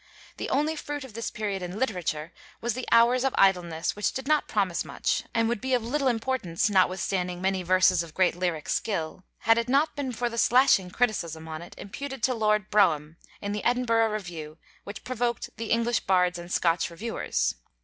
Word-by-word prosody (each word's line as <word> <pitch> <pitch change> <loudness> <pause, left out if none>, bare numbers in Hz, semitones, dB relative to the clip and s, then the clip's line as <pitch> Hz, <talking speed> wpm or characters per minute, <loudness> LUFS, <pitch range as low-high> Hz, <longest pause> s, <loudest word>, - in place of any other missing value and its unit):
The - - -4
only 300 +3 +1
fruit 290 -2 -5
of 260 -5 -11
this 230 0 -3
period 205 -3 -3
in 180 +2 -5
literature 180 -9 -2 0.3
was 235 0 -1
the 255 +2 -5
'Hours 240 +2 +5
of 270 - 0
Idleness,' 175 -4 +2
which 210 - 0
did 265 0 -6
not 305 -1 +2
promise 195 -5 0
much, - - -2
and 230 -1 +1
would 235 -2 -1
be 260 0 +1
of 240 - -1
little 270 +4 0
importance 225 -6 0
notwithstanding 185 -1 +1
many 190 0 0
verses 185 0 +4
of 165 -2 -9
great 185 -2 +3
lyric 175 -4 -2
skill, 185 -3 -2 0.2
had 225 +1 +4
it 235 +1 -3
not 285 +4 +2
been 280 -3 -3
for 240 +1 -2
the 235 0 -3
slashing 240 -8 +4
criticism 170 -8 -1
on 160 0 -6
it, 175 - -11
imputed 270 +4 -7
to 255 - +3
Lord 215 -3 +1
Brougham, 165 -7 +2 0.2
in 205 - -3
the 205 0 -3
Edinburgh 230 -2 +2
Review, 170 -7 -6 0.3
which 200 +1 -8
provoked 245 -1 -2
the 230 0 -5
'English 235 0 +2
Bards 180 -2 +2
and 175 +1 -9
Scotch 170 -1 +1
Reviewers.' 200 - -2
210 Hz, 190 wpm, -27 LUFS, 180-240 Hz, 0.3 s, Hours